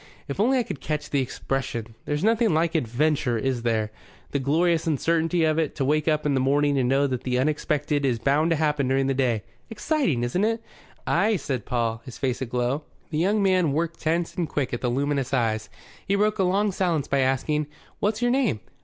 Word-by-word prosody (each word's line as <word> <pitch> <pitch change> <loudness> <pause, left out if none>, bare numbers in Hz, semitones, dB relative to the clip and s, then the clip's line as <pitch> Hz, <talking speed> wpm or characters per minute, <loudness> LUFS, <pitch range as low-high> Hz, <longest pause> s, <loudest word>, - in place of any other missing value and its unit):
If 140 - -5
only 255 +6 +3
I 250 - +2
could 150 - -7
catch 150 -1 -3
the 140 - +2
expression! 125 -3 -3
There's 150 +3 -2
nothing 225 -4 +3
like 165 +1 +1
adventure, 135 -2 +1
is 130 +1 -1
there? 110 -2 0 0.4
The 140 - 0
glorious 165 +5 +1
uncertainty 165 +2 +1
of 155 0 +2
it! 155 -3 -1
To 135 - -1
wake 150 +2 +1
up 155 -1 +1
in 145 - +2
the 135 - +2
morning 140 +1 +2
and 125 -1 +1
know 135 +2 +3
that 130 -3 -2
the 125 -1 0
unexpected 145 +1 0
is 130 -4 +1
bound 140 +8 +2
to 165 - +3
happen 150 -3 +1
during 135 +1 +2
the 135 - +1
day. 125 -5 0 0.3
Exciting, 225 - 0
isn't 125 +11 0
it?" 225 +1 0 0.4
"Ay," 210 +6 +2
said 135 - -3
Paul, 115 -2 -1
his 125 - -10
face 130 -2 -1
aglow. 125 +3 -1 0.3
The 155 - -1
young 200 +4 +2
man 185 -6 +3
worked 165 +2 -2
tense 165 +2 0
and 170 -4 -2
quick 135 -5 -2
at 120 - -2
the 125 - 0
luminous 140 +1 0
eyes. 110 -3 0 0.4
He 200 - +2
broke 210 +1 +1
a - - +4
long 200 +3 +2
silence 175 -6 0
by 140 - +1
asking, 135 +3 +1 0.3
"What's 215 +3 0
your 245 - +3
name?" 250 - +1
145 Hz, 210 wpm, -25 LUFS, 130-170 Hz, 0.4 s, a